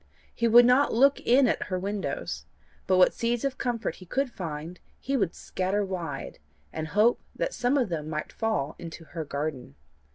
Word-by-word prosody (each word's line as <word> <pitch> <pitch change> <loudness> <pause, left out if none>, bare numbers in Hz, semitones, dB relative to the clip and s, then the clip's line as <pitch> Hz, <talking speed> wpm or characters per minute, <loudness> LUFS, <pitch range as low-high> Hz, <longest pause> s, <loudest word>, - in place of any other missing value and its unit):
He 235 - +1
would 240 +1 +8
not 255 +4 +4
look 275 +5 +4
in 255 +2 +4
at - - 0
her 185 - -2
windows, 200 +2 -4 0.4
but 185 - +4
what 180 - +6
seeds 235 +2 -1
of 270 -1 -2
comfort 240 -2 -2
he 185 - -13
could 265 +6 -1
find, 165 -2 -6 0.2
he 275 - -2
would 200 -10 0
scatter 195 +2 -1
wide, 175 -5 -5 0.3
and 155 0 -3
hope 210 +7 +3
that - - -2
some 245 +4 +1
of 245 -7 +1
them 155 -3 -3
might 155 -1 -4
fall 220 -11 -1
into 165 0 -8
her 165 0 -6
garden. 140 - -4
200 Hz, 185 wpm, -27 LUFS, 165-240 Hz, 0.4 s, would